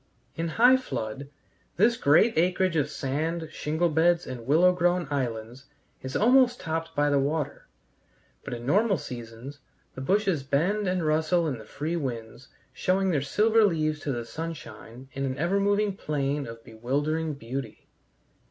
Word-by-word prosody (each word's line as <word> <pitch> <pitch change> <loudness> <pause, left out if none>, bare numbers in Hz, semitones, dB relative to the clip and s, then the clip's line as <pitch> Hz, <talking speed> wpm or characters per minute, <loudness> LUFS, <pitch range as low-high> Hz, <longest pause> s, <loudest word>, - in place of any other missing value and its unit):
In 165 +1 -2
high 245 +10 +5
flood 135 - -5 0.5
this 225 +6 +4
great 215 +6 +4
acreage 180 +1 +2
of 150 -3 +1
sand, 160 +4 -3
shingle 160 +4 -1
beds, 170 +2 +2
and 120 -2 -7
willow 175 +6 +5
grown 175 -1 +1
islands 120 -1 -3 0.4
is 130 0 -6
almost 245 +2 +4
topped 165 -1 -4
by 145 0 +2
the 140 - +3
water, 145 +1 -2 0.8
but - - -5
in 120 0 -8
normal 200 - +3
seasons 120 +2 -8 0.3
the 130 - -7
bushes 190 0 +1
bend 175 +10 0
and 180 -2 0
rustle 160 +2 +2
in 130 -6 -3
the 110 - -11
free 160 +9 -3
winds, 120 -3 -5 0.3
showing 190 +1 +1
their 145 -5 +1
silver 215 +10 +3
leaves 155 -6 +1
to 145 - -3
the 120 -2 -3
sunshine 135 -4 -8
in 135 - -3
an 130 0 -2
ever 175 +6 +1
moving 205 0 +1
plain 145 -5 -2
of 115 0 -10
bewildering 145 +7 -2
beauty. 125 -2 -7
155 Hz, 155 wpm, -27 LUFS, 135-180 Hz, 0.8 s, high